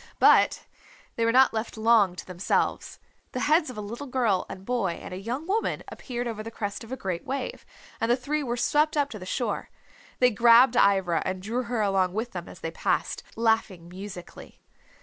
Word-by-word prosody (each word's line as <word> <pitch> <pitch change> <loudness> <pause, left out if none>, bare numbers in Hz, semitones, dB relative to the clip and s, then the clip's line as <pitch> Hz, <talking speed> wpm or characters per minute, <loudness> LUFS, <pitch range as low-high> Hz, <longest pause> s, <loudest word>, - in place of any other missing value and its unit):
But - - +5 0.5
they 230 - +1
were 230 - +3
not 260 +1 +5
left 220 0 -4
long 220 -4 +4
to - - -8
themselves. 185 +1 -1 0.4
The 255 - -2
heads 310 0 +3
of 250 - -8
a - - -3
little 235 +7 -7
girl 240 -7 +1
and 190 0 -9
boy 235 -7 0
and 175 - -9
a - - -5
young 245 +9 -4
woman 420 +5 -1
appeared 245 -2 -5
over 220 -2 -4
the 220 - -6
crest 205 -2 -5
of 225 - -12
a 260 - -3
great 185 -7 -3
wave, 270 0 -4 0.4
and 225 - +1
the 240 - +4
three 295 +4 -2
were 245 -3 -2
swept 300 +5 +2
up 285 -1 +1
to 215 - -7
the 185 - -9
shore. 245 +5 -2 0.5
They 250 0 +4
grabbed 235 +3 +6
Ivra 190 -6 +3
and 185 0 -3
drew 225 +6 -2
her 235 -1 -1
along 190 -3 +1
with 225 +4 -3
them - - -7
as - - -13
they - - -4
passed, - - -1
laughing 220 -6 0
musically. 185 -1 -10
230 Hz, 205 wpm, -26 LUFS, 195-250 Hz, 0.5 s, grabbed